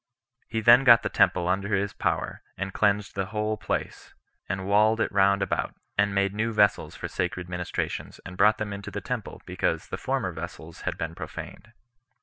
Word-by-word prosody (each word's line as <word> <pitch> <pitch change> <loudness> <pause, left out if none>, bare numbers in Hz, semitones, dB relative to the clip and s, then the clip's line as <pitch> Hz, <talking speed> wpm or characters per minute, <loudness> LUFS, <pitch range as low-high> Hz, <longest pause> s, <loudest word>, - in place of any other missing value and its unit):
He 110 -1 -2
then 120 +4 +7
got 120 -3 +7
the - - -1
temple 90 -1 +3
under 100 +3 +1
his 100 +1 -1
power, - - -2 0.2
and 95 +1 -4
cleansed 105 -1 +1
the 95 -1 -2
whole 105 0 -1
place, - - -4 0.3
and 95 +1 -2
walled 105 +3 +4
it - - 0
round 100 0 +3
about, 95 - -2 0.2
and 100 0 +2
made 100 0 +2
new 110 +2 -1
vessels 105 -2 +2
for - - -5
sacred 90 0 -3
ministrations, 90 -1 -4
and 90 - -8
brought 105 +3 +4
them 105 -1 -3
into 100 +1 -6
the 105 0 -4
temple, 120 +2 -5
because 85 -3 -2
the - - -4
former - - -1
vessels 80 0 -8
had - - -6
been 80 0 -4
profaned. 105 +5 -9
100 Hz, 185 wpm, -26 LUFS, 95-105 Hz, 0.3 s, then